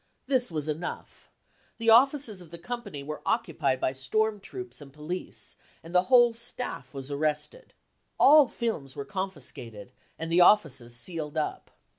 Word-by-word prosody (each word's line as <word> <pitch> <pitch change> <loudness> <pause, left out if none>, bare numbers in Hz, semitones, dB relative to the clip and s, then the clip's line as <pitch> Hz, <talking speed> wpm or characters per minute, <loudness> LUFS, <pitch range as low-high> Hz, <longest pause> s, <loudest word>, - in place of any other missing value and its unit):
This 255 -3 +1
was 155 -2 -2
enough: 160 +3 -6 0.5
the 230 -1 +3
offices 245 -4 +4
of 170 - -14
the 170 - -9
company 205 -7 -6
were 150 +2 -6
occupied 135 -4 0
by 130 - 0
storm 210 +11 0
troops 370 - -7
and 140 -1 -12
police 150 +6 -7 0.3
and 165 +2 -11
the 180 0 +4
whole 240 -2 +6
staff 235 +2 -4
was 135 +1 -5
arrested. 155 - -2 0.4
All 295 -1 +8
films 190 - -4
were 140 - -5
confiscated, 130 - -4 0.3
and 165 +1 -5
the 175 +2 +5
offices 140 - +4
sealed 155 +3 -2
up. 155 - -3
170 Hz, 150 wpm, -28 LUFS, 140-230 Hz, 0.5 s, All